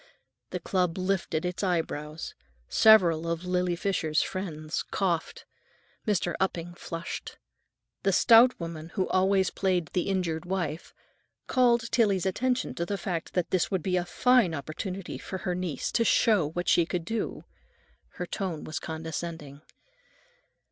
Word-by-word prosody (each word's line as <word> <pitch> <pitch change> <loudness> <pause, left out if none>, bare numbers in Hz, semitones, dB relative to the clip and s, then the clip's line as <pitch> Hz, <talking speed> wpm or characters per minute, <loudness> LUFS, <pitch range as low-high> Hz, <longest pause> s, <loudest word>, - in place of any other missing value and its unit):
The - - -3
club 180 -2 0
lifted 185 -3 -1
its 180 0 -3
eyebrows. 160 -4 -2 0.3
Several 170 -7 +5
of 170 +1 -2
Lily 180 -1 +1
Fisher's 170 -4 0
friends 160 -5 -4
coughed. 175 -5 -2 0.6
Mr. 180 -4 +1
Upping 175 -2 -1
flushed. 165 -1 -6 0.6
The 195 - +2
stout 235 +5 +6
woman 165 -1 -6
who 190 -3 +1
always 190 0 +3
played 180 -5 0
the 180 +2 0
injured 175 -4 -1
wife 175 -4 -3 0.5
called 235 -3 +2
Tillie's 200 -6 +2
attention 250 +7 0
to 170 - -2
the 200 - -2
fact 175 -4 -4
that 180 -2 0
this 185 -2 +2
would 190 -5 -1
be 185 -1 0
a 180 - +1
fine 230 0 +3
opportunity 175 +6 -5
for 190 - -5
her 180 -1 -2
niece 175 -6 -3
to 230 - +2
show 210 -9 +3
what 175 +3 -4
she 170 - +5
could 175 -2 -3
do. 225 +3 -3 0.7
Her 180 - -4
tone 175 -4 -4
was 155 - -4
condescending. 160 -2 -6
180 Hz, 140 wpm, -28 LUFS, 165-195 Hz, 0.7 s, stout